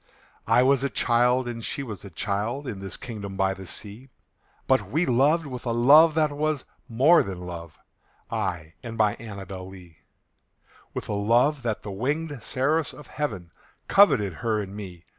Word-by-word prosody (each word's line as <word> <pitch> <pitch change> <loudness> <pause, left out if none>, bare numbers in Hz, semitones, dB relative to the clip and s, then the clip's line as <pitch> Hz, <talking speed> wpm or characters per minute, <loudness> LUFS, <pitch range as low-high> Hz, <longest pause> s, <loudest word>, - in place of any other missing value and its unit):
I 115 +3 +5
was 135 0 +3
a 140 - +1
child 125 +1 +2
and 115 -1 -5
she 140 - -3
was 110 -8 -7
a 100 - -9
child, 105 - -3
In 105 -6 -5
this 95 -1 -6
kingdom 105 -6 -7
by 95 0 +2
the 95 -1 -10
sea: 110 +9 -8 0.6
But 130 0 +2
we 160 +5 +1
loved 145 +6 +3
with 125 -3 -7
a - - +1
love 150 +7 +7
that 155 -2 +2
was 150 -1 -1 0.2
more 135 +9 +5
than 95 -2 -5
love 85 -3 -8 0.5
I 80 +1 -3
and 115 -2 -7
my 105 -2 +3
ANNABEL 95 -4 -8
LEE; 90 -4 -14 1.0
With - - -4
a - - -2
love 120 +8 +2
that 110 -5 -3
the 105 - -6
winged 145 +6 -2
seraphs 145 +7 0
of 150 - -12
heaven 95 - -4 0.4
Coveted 135 - +5
her 110 -3 0
and 100 -1 -6
me. 90 -5 -9
115 Hz, 175 wpm, -25 LUFS, 100-140 Hz, 1.0 s, love